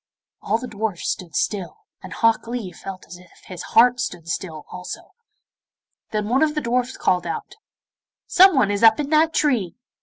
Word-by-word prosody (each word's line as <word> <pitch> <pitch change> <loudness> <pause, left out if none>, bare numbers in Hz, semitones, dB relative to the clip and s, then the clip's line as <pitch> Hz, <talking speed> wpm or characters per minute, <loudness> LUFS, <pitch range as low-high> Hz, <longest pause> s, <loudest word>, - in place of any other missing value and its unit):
All 215 +3 0
the 245 - -7
dwarfs 215 -4 -3
stood 170 -4 -7
still, 195 - -2 0.2
and - - -10
Hok 230 0 +1
Lee 235 -6 -4
felt 185 +2 -9
as 175 - -11
if 180 0 -18 0.2
his 180 -2 -8
heart 245 +2 +4
stood 170 -7 -4
still 160 -4 -5
also. 180 0 -8 1.0
Then 210 -2 -2
one 250 +4 +2
of 310 -1 +2
the 300 - 0
dwarfs 250 +1 -1
called 180 -1 +1
out, 165 - -5 0.7
'Someone 310 - +5
is 205 - -2
up 225 +2 +6
in 290 0 -3
that 315 +1 +4
tree. 245 - 0
220 Hz, 175 wpm, -22 LUFS, 180-250 Hz, 1.0 s, up